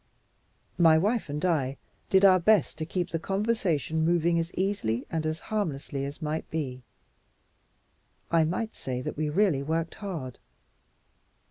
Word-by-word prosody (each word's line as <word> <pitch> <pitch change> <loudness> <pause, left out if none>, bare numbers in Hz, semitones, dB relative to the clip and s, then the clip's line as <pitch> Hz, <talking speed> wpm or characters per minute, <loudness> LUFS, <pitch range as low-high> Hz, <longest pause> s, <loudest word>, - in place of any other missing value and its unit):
My 165 -2 +7
wife 210 +2 0
and 150 +4 -2
I 140 -6 0 0.3
did 190 +1 +5
our 185 -1 +7
best 195 -3 +3
to 155 - -3
keep 180 0 -2
the 165 - -1
conversation 195 - 0
moving 170 0 +2
as 165 +1 -3
easily 185 - -1
and 160 -1 -1
as 155 +1 -2
harmlessly 145 -10 -3
as 145 +4 -7
might 155 +1 -3
be. 130 -5 -3 1.5
I 165 -1 +5
may 185 +8 -1
say 125 -1 -5
that - - -4
we 155 0 -1
really 170 -4 +2
worked 160 +3 -2
hard. 165 - -6
165 Hz, 145 wpm, -28 LUFS, 150-185 Hz, 1.5 s, My